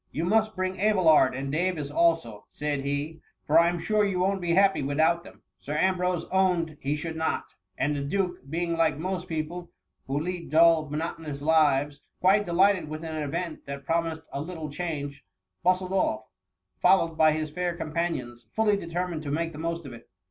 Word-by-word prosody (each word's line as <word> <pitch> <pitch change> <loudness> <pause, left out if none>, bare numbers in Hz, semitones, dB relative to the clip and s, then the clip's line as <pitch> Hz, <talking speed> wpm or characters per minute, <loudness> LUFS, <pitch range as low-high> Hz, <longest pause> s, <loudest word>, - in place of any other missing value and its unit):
You 160 - -2
must 220 +3 +2
bring 185 0 -2
Abelard 175 -11 +4
and 135 +1 -4
Davis 155 -2 -1
also,^ 160 -10 +1
said 150 -1 -2
he» 145 +3 -3
'* - - -50
for 155 +3 +5
I 170 0 +5
'm 175 - -2
sure 210 +4 +1
you 195 -2 0
won't 190 +1 +1
be 170 -1 0
happy 195 -1 +4
without 160 +5 +2
them/' - - -15 0.2
Sir 145 +11 -5
Ambrose 180 0 +1
owned 180 -4 +1
he 140 +2 -1
should 160 +2 -5
not; 160 0 -2 0.2
and 145 +2 0
the 140 - -2
duke, 180 +6 -1
being 170 +2 -1
like 165 -3 +2
most 180 +2 -3
people 170 +1 -4 0.4
who 135 +2 -1
lead 175 +2 -4
dull, 160 -1 +5
monotonous 150 -1 -4
lives, 145 -2 +2 0.2
quite 195 +2 +3
delighted 185 -1 +3
with 155 +1 -6
an 160 -1 -4
event 160 +2 -4
that 140 0 -6
promised 165 -1 -1
a 140 - -2
little 160 -2 -6
change, 145 -4 -4 0.4
bustled 185 +1 +1
off, 190 - +1 0.6
fol 190 - +5
lowed 165 -1 -9
by 155 0 +5
his 155 -1 -3
fair 175 +1 -2
companions, 155 -8 -3
fully 210 - +2
determined 175 -3 -3
to 150 - -6
make 165 +3 -1
the 150 - -10
most 165 0 -3
of 130 - -8
it. 120 - -14
165 Hz, 190 wpm, -27 LUFS, 150-180 Hz, 0.6 s, for